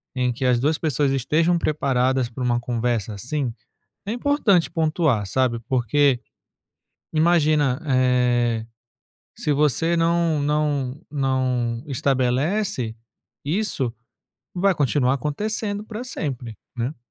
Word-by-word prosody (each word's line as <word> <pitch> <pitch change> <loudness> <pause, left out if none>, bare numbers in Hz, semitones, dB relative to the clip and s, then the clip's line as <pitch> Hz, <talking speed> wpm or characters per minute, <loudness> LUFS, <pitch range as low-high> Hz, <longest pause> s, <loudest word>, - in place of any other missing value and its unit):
em 125 -1 +1
que 130 +3 -3
as 125 -1 +3
2 150 +5 +1
pessoas 145 -3 0
estejam 155 +6 +2
preparadas 130 -5 +1
para 125 +2 -6
uma 120 -1 +1
conversa, 120 -3 -1
assim, 125 +3 -3 0.5
é 205 - -3
importante 240 - +2
pontuar, 155 - +1
sabe? 120 +2 +1
Porque 130 +1 +2 0.9
imagina, 155 -4 +3
eh, 125 -3 +2 0.7
se 150 - -1
você 150 +4 +2
não 165 -2 +2
não 145 -2 0
não 130 -4 0
estabelece 135 - 0 0.5
isso, 150 - -1 0.6
vai 190 +1 +2
continuar 135 -3 +2
acontecendo 205 - -3
para 220 +2 -6
sempre, 130 - -5 0.2
né. 125 +5 -3
135 Hz, 110 wpm, -23 LUFS, 125-160 Hz, 0.9 s, as